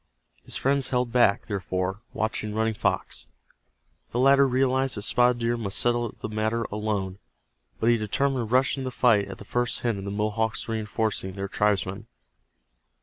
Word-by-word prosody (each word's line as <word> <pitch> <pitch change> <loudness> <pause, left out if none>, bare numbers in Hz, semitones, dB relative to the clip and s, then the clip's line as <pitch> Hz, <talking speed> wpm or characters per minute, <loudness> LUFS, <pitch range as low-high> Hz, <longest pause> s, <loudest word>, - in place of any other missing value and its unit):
His - - -3
friends 135 0 +1
held 125 -2 0
back, 120 -5 +3
therefore, 95 0 -2
watching 110 -1 -2
Running 110 0 +1
Fox. - - -2 0.8
The - - -4
latter 135 +2 +5
realized 130 -1 +1
that 105 - -3
Spotted 125 +2 +3
Deer 120 0 0
must 100 -4 -2
settle 120 -1 +1
the - - -3
matter 110 +2 -1
alone, 100 -3 -2 0.6
but 115 - +3
he 120 - +4
determined 120 +2 0
to - - -12
rush 130 0 +3
into 130 - -4
the - - -3
fight 105 -5 +4
at 95 -1 -8
the 105 - -11
first 120 +3 -1
hint 115 -4 0
of 95 - -7
the - - -3
Mohawks 110 +2 -1
reinforcing 110 -3 -2
their 100 +1 -4
tribesman. 100 +1 0
110 Hz, 170 wpm, -26 LUFS, 100-120 Hz, 0.8 s, latter